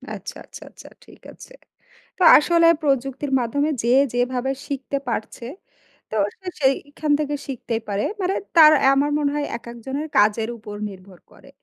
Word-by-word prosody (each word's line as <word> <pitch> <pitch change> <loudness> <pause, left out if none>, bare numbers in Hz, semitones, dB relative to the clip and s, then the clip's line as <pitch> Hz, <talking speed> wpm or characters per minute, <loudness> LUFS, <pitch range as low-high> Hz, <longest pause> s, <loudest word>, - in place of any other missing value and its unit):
আচ্ছা, - - -9
আচ্ছা, - - -13
আচ্ছা - - -14 0.2
ঠিক - - -18
আছে। - - -15 0.6
তো 370 - 0
আসলে 335 +2 +3
প্রযুক্তির 270 -1 -1
মাধ্যমে 285 +5 -1
যে 235 - 0 0.2
যেভাবে 250 +1 -1 0.2
শিখতে 280 0 -4
পারছে 230 +1 -5 0.7
তো 220 - -2 0.2
সে 375 - -14
সেইখান 285 +2 0
থেকে 295 -1 -2
শিখতেই 235 -4 -4
পারে। 200 0 -1 0.2
মানে 370 +1 0 0.2
তার 310 -2 +9
অ্যা 270 - +5
আমার 290 +1 +1
মনে 285 -1 0
হয় 295 - -1
একেকজনের 240 +6 -7
কাজের 215 +2 +2
উপর 210 -2 -9
নির্ভর 185 -2 -14
করে। - - -18
270 Hz, 155 wpm, -22 LUFS, 230-290 Hz, 0.7 s, তার